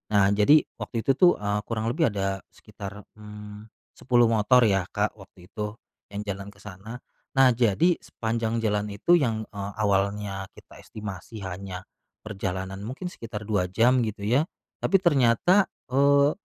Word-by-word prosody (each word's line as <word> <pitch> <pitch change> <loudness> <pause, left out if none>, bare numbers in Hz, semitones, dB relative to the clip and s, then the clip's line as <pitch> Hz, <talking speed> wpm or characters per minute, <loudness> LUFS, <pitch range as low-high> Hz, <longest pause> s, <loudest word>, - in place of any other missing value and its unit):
Nah 100 -1 +5
jadi 105 +10 +5 0.2
waktu 115 - -3
itu - - +3
tuh, 180 +1 +7
eee, 105 0 0
kurang 115 -1 -2
lebih 160 +4 +2
ada 95 -1 -1
sekitar, 100 +1 -10 0.2
mmm, 105 0 -10 0.3
10 120 -2 +3
motor 115 +3 +4
ya 95 -4 +2
Kak, 105 +1 0
waktu 95 -2 -16
itu, 105 -1 -4 0.4
yang 100 - -3
jalan 100 -1 -5
ke 100 - -23
sana. 105 +5 -9 0.3
Nah 135 -1 +6
jadi 120 - +2
sepanjang 115 0 -2
jalan 105 -1 0
itu 105 - 0
yang, 115 -6 0
eee, 100 -1 -5
awalnya 100 -1 -1
kita - - -16
estimasi 105 0 -8
hanya, 95 0 -6 0.4
perjalanan 95 -2 -4
mungkin 175 +9 -6
sekitar 110 -6 -7
2 100 -4 0
jam 120 +7 +3
gitu 110 -3 -3
ya, 125 +10 +2 0.3
tapi - - 0
ternyata, 170 - +4 0.2
eee, 140 +2 +4
105 Hz, 155 wpm, -26 LUFS, 100-120 Hz, 0.4 s, tuh